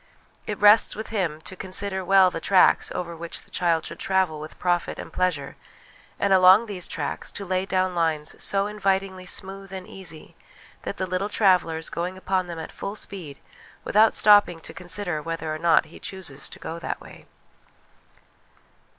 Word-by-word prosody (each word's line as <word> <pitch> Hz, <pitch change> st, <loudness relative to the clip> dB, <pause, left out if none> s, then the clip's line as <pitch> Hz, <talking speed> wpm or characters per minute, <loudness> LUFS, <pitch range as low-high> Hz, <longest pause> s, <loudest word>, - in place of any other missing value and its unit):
It 210 Hz, -, -3 dB
rests 210 Hz, +2 st, +6 dB
with 220 Hz, -, -6 dB
him 175 Hz, -8 st, -2 dB
to 185 Hz, -, -8 dB
consider 190 Hz, +1 st, -2 dB
well 190 Hz, 0 st, +5 dB
the 165 Hz, -, -4 dB
tracks 190 Hz, -2 st, +4 dB
over 170 Hz, -1 st, -4 dB
which 170 Hz, +1 st, -6 dB
the -, -, -22 dB
child 170 Hz, -2 st, +1 dB
should -, -, -7 dB
travel 190 Hz, -5 st, +1 dB
with 155 Hz, +1 st, -9 dB
profit 175 Hz, -1 st, 0 dB
and -, -, -9 dB
pleasure; 170 Hz, -7 st, -1 dB, 0.6 s
and, 200 Hz, -1 st, +2 dB
along 190 Hz, +4 st, +7 dB
these 195 Hz, -5 st, -3 dB
tracks, 145 Hz, -2 st, -3 dB
to 200 Hz, -, -5 dB
lay 185 Hz, +1 st, -1 dB
down 185 Hz, -1 st, +1 dB
lines 160 Hz, -3 st, 0 dB
so 195 Hz, 0 st, +1 dB
invitingly 195 Hz, -2 st, -1 dB
smooth 195 Hz, 0 st, -4 dB
and 190 Hz, -1 st, -7 dB
easy 165 Hz, -5 st, -9 dB, 0.5 s
that -, -, -5 dB
the 185 Hz, -, -1 dB
little 185 Hz, +3 st, -2 dB
traveller 180 Hz, -7 st, +3 dB
is 160 Hz, -, -4 dB
going 180 Hz, +2 st, -3 dB
upon 185 Hz, -1 st, -1 dB
them 170 Hz, -1 st, -6 dB
at 160 Hz, -, -7 dB
full 200 Hz, +1 st, -6 dB
speed 175 Hz, -10 st, -8 dB, 0.5 s
without 215 Hz, +1 st, +4 dB
stopping 205 Hz, -5 st, +5 dB
to -, -, -10 dB
consider 175 Hz, -3 st, -3 dB
whether 165 Hz, 0 st, -4 dB
or 155 Hz, -, -5 dB
no 170 Hz, 0 st, +5 dB
he -, -, -14 dB
chooses 170 Hz, -8 st, -5 dB
to -, -, -9 dB
go 165 Hz, +1 st, -6 dB
that -, -, -4 dB
way. -, -, -14 dB
185 Hz, 175 wpm, -25 LUFS, 165-195 Hz, 0.6 s, along